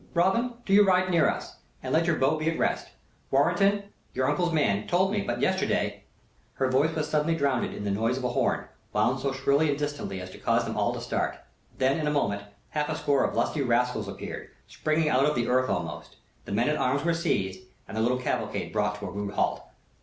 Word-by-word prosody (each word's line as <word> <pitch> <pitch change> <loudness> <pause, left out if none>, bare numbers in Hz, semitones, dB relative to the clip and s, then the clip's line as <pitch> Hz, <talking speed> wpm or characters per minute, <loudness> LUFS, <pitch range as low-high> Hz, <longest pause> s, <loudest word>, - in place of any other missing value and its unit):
Robin, 190 +8 +2
do 195 - 0
you 205 +1 +8
ride 185 -1 +3
near 170 -2 +4
to - - +1
me, - - -8 0.4
and - - -3
let 165 +2 +3
your 170 - +3
bow 135 +3 +2
be 155 +1 0
at 165 - -2
rest. - - 0 0.4
Warrenton, 175 +8 +3 0.3
your 130 +1 +1
uncle's 170 +5 +1
man, 105 -10 +1
told 185 +2 +2
me 210 -1 0
but 120 -7 -3
yesterday - - 0 0.3
" - - -37
Her 130 -1 0
voice 145 +5 +2
was 155 -1 -1
suddenly 155 +2 +1
drowned 140 -5 0
in - - -6
the 100 - -1
noise 115 +5 0
of 130 - -5
a 125 - +1
horn, 120 - 0 0.3
wound 110 +5 +2
so 135 +1 -1
shrilly 140 +3 +2
and 140 - +1
distantly 145 -9 -3
as 90 0 -8
to - - -12
cause - - +1
them - - -4
all - - +1
to - - -5
start. - - -2 0.4
Then, 135 +4 +2
in 150 - -1
a - - +2
moment, 100 -9 0 0.3
half 150 -1 -1
a 155 - -1
score 145 -3 +2
of - - -1
lusty 150 - 0
rascals 120 -3 +1
appeared, 100 - -7 0.2
springing 155 0 0
out 135 -2 +3
of 150 0 +1
the 120 -1 0
earth 130 +1 +2
almost. 85 -4 -4 0.3
The - - -8
men 115 +4 +1
at 150 - +1
arms 140 +3 0
were 170 - +3
seized, 95 - -1 0.3
and - - -8
the 110 - 0
little 125 +3 +2
cavalcade 125 -3 -2
brought 105 -1 +1
to - - -5
a 90 - -5
rude 100 +1 -4
halt. - - +1
140 Hz, 235 wpm, -27 LUFS, 115-160 Hz, 0.4 s, you